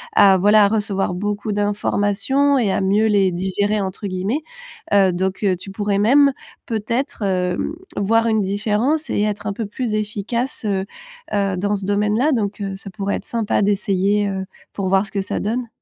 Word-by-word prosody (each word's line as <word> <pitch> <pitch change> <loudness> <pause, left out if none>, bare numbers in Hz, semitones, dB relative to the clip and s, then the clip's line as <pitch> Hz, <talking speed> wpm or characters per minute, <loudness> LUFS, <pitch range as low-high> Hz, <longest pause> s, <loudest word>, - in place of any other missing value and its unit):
à, 195 -2 +7
voilà, 205 +2 +5
à - - +4
recevoir 200 -3 -1
beaucoup 205 +3 -3
d'informations 205 +6 +1
et 220 -6 +1
à - - 0
mieux 200 +3 +2
les 200 -3 +3
«digérer» 200 +4 0
entre 195 +2 -4
guillemets, 195 +10 -2 0.5
heu, 195 -2 +5
donc 190 +3 -2
heu, 190 -2 +3
tu 190 - -10
pourrais 200 0 -1
même 275 +6 +5 0.3
peut-être, 230 +4 -2
hem, 180 - -1 0.2
voir 225 +3 +2
une 220 -1 +2
différence 200 +1 -3 0.5
et - - 0
être 210 -1 -2
un 200 - -1
peu 220 +2 -4
plus 220 +1 -3
efficace, 210 -1 -3 0.4
heu 195 -2 0 0.5
heu, 195 -2 0
dans 205 +3 0
ce 195 -1 -5
domaine-là. 210 +8 +1
Donc, 210 -4 -1
heu, 195 -1 -3
ça 195 +1 -9
pourrait 200 0 -2
être - - -10
sympa 225 -3 0
d'essayer, 200 0 +1
heu, 190 -1 -3 0.3
pour 195 -2 -2
voir 195 +2 +3
ce 195 - -13
que 200 - -1
ça 190 - -3
donne. 235 +4 -2
205 Hz, 185 wpm, -20 LUFS, 195-215 Hz, 0.5 s, à